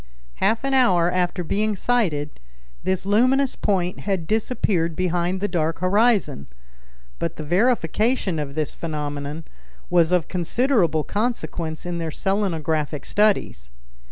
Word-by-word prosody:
Half 225 +3 +1
an 275 0 0
hour 180 -10 +4
after 180 0 0
being 210 +5 0
sighted, 180 -10 -1 0.4
this 190 0 -1
luminous 255 +6 +3
point 180 -3 -1
had 190 -5 -2
disappeared 195 -5 0
behind 180 +1 0
the 205 - +1
dark 165 -4 -1
horizon; 200 - +2 0.7
but - - -2
the 155 - -6
verification 200 - +1
of 140 -2 -5
this 155 -2 -2
phenomenon 150 -1 -4 0.5
was 170 -1 +4
of 180 -3 +2
considerable 180 - +1
consequence 180 -8 -3
in 175 -1 -3
their 165 -1 -3
selenographic 160 -6 -1
studies. 205 - +1
180 Hz, 125 wpm, -23 LUFS, 160-210 Hz, 0.7 s, hour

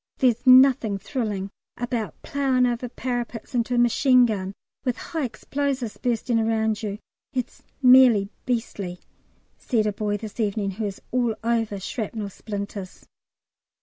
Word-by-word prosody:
There's 250 -1 +2
nothing 255 -5 +6
thrilling 200 -3 -3 0.3
about 240 -3 -3
ploughing 265 -3 +1
over 245 0 -1
parapets 240 -2 -4
into 245 0 0
a - - +1
machine 250 +1 +5
gun, 195 -4 -2 0.3
with 250 -3 -1
high 320 -4 -3
explosives 260 0 -3
bursting 235 -1 0
round 220 -1 0
you, 205 -2 -3 0.4
it's 250 -2 -4 0.2
merely 250 -6 +7 0.2
beastly," 205 -7 -3 0.6
said 225 -4 0
a 210 - 0
boy 205 0 -1
this 215 +2 -9
evening, 205 -2 0
who 210 +3 -4
is 195 -2 -6
all 240 -3 +1
over 225 -3 0
shrapnel 210 0 -4
splinters. 200 -2 -7
230 Hz, 135 wpm, -24 LUFS, 210-250 Hz, 0.6 s, merely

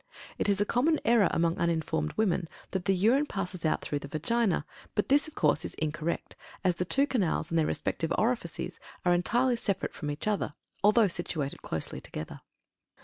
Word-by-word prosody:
It - - +1
is 200 -1 +2
a 205 - +3
common 295 +9 +2
error 230 -4 +5
among 165 0 +1
uninformed 160 -2 0
women 185 -6 +1 0.2
that 190 -2 -2
the 195 - +3
urine 240 +10 +3
passes 180 - -4
out 155 - +1
through 145 - -2
the 140 - -8
Vagina; 175 +4 +1 0.3
but 210 - 0
this, 285 +3 +4
of 310 - -12
course, 150 +1 +2
is - - -4
incorrect, 155 +2 -3 0.3
as 180 -2 +2
the 180 - 0
two 270 +10 +3
canals 200 - 0
and 165 - +3
their 155 - +2
respective 165 0 -1
orifices 185 -6 -1 0.3
are 175 - +5
entirely 240 +8 +2
separate 200 -4 -1
from 150 - -5
each 145 +7 -4
other, 205 -8 0 0.3
though 210 +1 +6
situated 165 -5 -3
closely 80 - -4
together. 80 - -7
180 Hz, 185 wpm, -29 LUFS, 160-225 Hz, 0.3 s, though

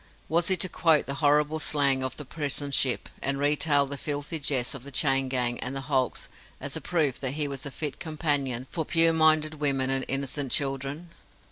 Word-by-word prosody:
Was 170 +2 +1
he 190 - +3
to 180 - +3
quote 165 -4 +2
the 140 - -4
horrible 150 +1 +2
slang 140 -3 +2
of 130 0 -4
the 150 - -8
prison 145 0 -4
ship, 130 -2 +1
and 135 0 0
retail 145 0 +3
the 140 0 -7
filthy 145 +2 -2
jests 135 -4 +1
of 140 - -7
the 140 - -7
chain 135 -1 +2
gang 125 -2 -1
and 130 +2 -4
the 135 - -3
hulks, 135 -2 -1 0.3
as - - -4
a - - -4
proof 155 -7 0
that 135 0 -2
he 150 -1 +1
was 140 0 -4
a - - -4
fit 145 0 -5
companion 145 -6 -2
for 165 - -2
pure 165 +1 +3
minded 155 -1 +3
women 135 -2 +1
and 135 0 0
innocent 135 0 -2
children? 140 +4 -2
145 Hz, 205 wpm, -27 LUFS, 135-155 Hz, 0.3 s, he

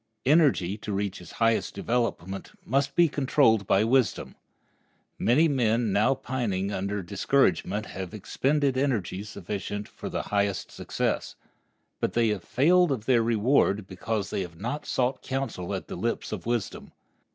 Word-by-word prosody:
Energy, 130 - +3
to 105 - -5
reach 100 -2 -2
its 90 - -12
highest 115 -1 +1
development, 115 -5 -2
must 140 +3 0
be 175 -1 +6
controlled 130 -8 +2
by 100 - +4
wisdom. 125 0 +1 0.9
Many 145 +8 +4
men 115 -6 +1
now 105 +7 +3
pining 115 -7 -2
under 100 0 -2
discouragement 105 +2 +1
have 95 -4 -6
expended 135 +5 0
energy 110 -9 -1
sufficient 105 0 -5
for - - -8
the - - -3
highest 100 -2 -1
success. - - -2 0.6
But - - -1
they 115 -1 +3
have 105 -4 -2
failed 175 +4 +3
of 115 -6 -2
their 120 -2 +4
reward 115 -2 +2
because 100 +2 -3
they - - -1
have 85 -3 -8
not 140 +9 -4
sought 130 +1 0
counsel 130 -9 -3
at - - -6
the - - -6
lips - - -2
of - - -5
wisdom. 120 -4 -3
115 Hz, 150 wpm, -27 LUFS, 100-135 Hz, 0.9 s, be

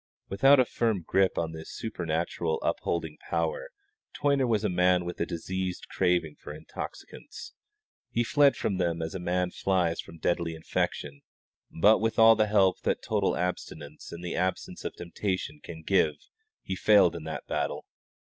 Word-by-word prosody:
Without 135 +8 +5
a 130 - +5
firm 110 -6 -1
grip 95 +2 +2
on 80 -1 -1
this 80 0 -9
supernatural 85 -5 -2
upholding 80 -2 -2
power - - -1 0.5
Toyner 140 -2 +2
was 110 -3 +1
a - - +2
man 90 -1 +2
with 90 - -5
a 85 - 0
diseased 90 +2 -4
craving 90 -4 0
for - - -9
intoxicants. 80 +1 -9 0.6
He 120 - 0
fled 140 +2 +4
from 100 - -1
them 85 -2 0
as 80 - -4
a 95 - -4
man 90 +1 -1
flies 90 -3 0
from 85 - -13
deadly 85 0 -1
infection; 75 -2 -3 0.5
but 105 +7 +4
with 115 0 -1
all 115 0 +8
the 110 - +2
help 100 -3 +3
that - - -1
total - - 0
abstinence 80 -4 -5
and 85 +1 -8
the 85 - -3
absence 90 0 -2
of - - -5
temptation 90 -3 -3
can 80 -1 -9
give 80 -4 +2 0.5
he - - -3
failed - - +5
in - - -7
the - - -5
battle. - - -2
90 Hz, 165 wpm, -28 LUFS, 85-105 Hz, 0.6 s, all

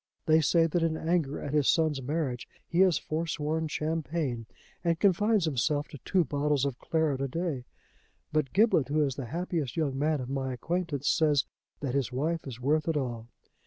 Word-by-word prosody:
They 160 0 +5
say 165 +3 +4
that 165 +1 0
in 165 -1 +1
anger 160 -4 0
at 145 - -5
his 150 -3 +3
son's 155 -4 +2
marriage 135 -3 -2 0.2
he 170 - -1
has 185 -3 +5
forsworn 160 0 -2
champagne 155 -6 -2 0.4
and 165 -2 +1
confines 205 0 +3
himself 145 0 0
to 145 - -10
two 180 +9 +2
bottles 145 -2 0
of 135 -3 -3
claret 160 -5 0
a 135 - 0
day. 150 -3 -3 0.7
But 155 -4 +1
Giblet, 200 - +4
who 150 +2 +2
is 140 -2 0
the 125 -1 -6
happiest 165 -1 -3
young 140 -4 0
man 150 0 +1
of 125 - -5
my 135 -1 -2
acquaintance, 160 0 -2
says 150 -4 +3 0.4
that 135 -3 -2
his 135 -2 0
wife 155 +5 -1
is 125 -3 -7
worth 150 +5 +1
it 160 -2 +1
all. 120 -4 -3
150 Hz, 185 wpm, -29 LUFS, 135-165 Hz, 0.7 s, They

